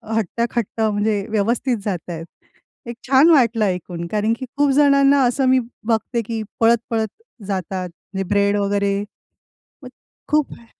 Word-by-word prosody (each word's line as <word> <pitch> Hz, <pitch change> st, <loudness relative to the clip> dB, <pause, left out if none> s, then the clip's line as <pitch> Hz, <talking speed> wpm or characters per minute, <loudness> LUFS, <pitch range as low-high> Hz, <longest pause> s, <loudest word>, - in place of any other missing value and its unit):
हट्टाकट्टा 225 Hz, +1 st, -1 dB
म्हणजे 205 Hz, -1 st, 0 dB
व्यवस्थित 230 Hz, +4 st, 0 dB
जात 180 Hz, -4 st, -4 dB
आहेत. 165 Hz, -1 st, -5 dB, 0.6 s
एक 235 Hz, 0 st, -6 dB
छान 270 Hz, +5 st, +6 dB
वाटलं 235 Hz, -8 st, +4 dB
ऐकून, 180 Hz, -2 st, -3 dB
कारण 215 Hz, +1 st, +1 dB
की 260 Hz, -, -5 dB
खूप 290 Hz, 0 st, +3 dB
जणांना 280 Hz, -1 st, +5 dB
असं 255 Hz, +2 st, +1 dB
मी 260 Hz, 0 st, +5 dB, 0.3 s
बघते 230 Hz, +1 st, 0 dB
की 225 Hz, 0 st, -3 dB, 0.2 s
पळत-पळत 225 Hz, -1 st, +2 dB, 0.4 s
जातात, 185 Hz, -1 st, -3 dB, 0.2 s
म्हणजे 190 Hz, -1 st, -3 dB
ब्रेड 200 Hz, 0 st, +2 dB
वगैरे. 200 Hz, 0 st, 0 dB, 0.8 s
मग 255 Hz, -, -9 dB, 0.4 s
खूप 300 Hz, -1 st, +1 dB
हे 235 Hz, -, -19 dB
225 Hz, 140 wpm, -20 LUFS, 200-245 Hz, 0.8 s, छान